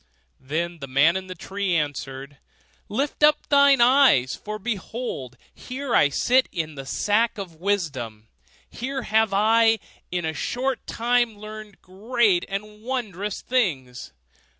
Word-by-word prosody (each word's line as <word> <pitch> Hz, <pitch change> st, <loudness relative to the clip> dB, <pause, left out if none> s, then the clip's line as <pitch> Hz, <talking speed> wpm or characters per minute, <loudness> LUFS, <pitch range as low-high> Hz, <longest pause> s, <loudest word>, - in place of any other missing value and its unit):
Then 165 Hz, +5 st, -3 dB
the 135 Hz, -, -7 dB
man 140 Hz, +6 st, +4 dB
in 190 Hz, 0 st, -4 dB
the 185 Hz, -, -7 dB
tree 190 Hz, +1 st, -2 dB
answered, 140 Hz, -2 st, -4 dB, 0.5 s
'Lift 275 Hz, +9 st, -2 dB
up 300 Hz, 0 st, +4 dB
thine 280 Hz, -2 st, +6 dB
eyes, 245 Hz, -, +5 dB
for 210 Hz, 0 st, -6 dB
behold 205 Hz, -, -5 dB, 0.2 s
here 260 Hz, 0 st, -5 dB
I 145 Hz, -, +5 dB
sit 250 Hz, -, +2 dB
in 160 Hz, -3 st, -3 dB
the 135 Hz, -2 st, -8 dB
sack 215 Hz, +8 st, +1 dB
of 180 Hz, -5 st, -7 dB
wisdom; 145 Hz, -, -2 dB, 0.4 s
here 265 Hz, +1 st, -5 dB
have 220 Hz, -1 st, +2 dB
I, 225 Hz, +3 st, +4 dB, 0.3 s
in 175 Hz, -2 st, -2 dB
a 160 Hz, -, -2 dB
short 255 Hz, -, -2 dB
time, 240 Hz, -1 st, +1 dB
learned 215 Hz, -1 st, -10 dB
great 205 Hz, 0 st, +1 dB
and 210 Hz, +2 st, -6 dB
wondrous 210 Hz, -5 st, -4 dB
things. 140 Hz, -, -1 dB
205 Hz, 135 wpm, -24 LUFS, 160-240 Hz, 0.5 s, thine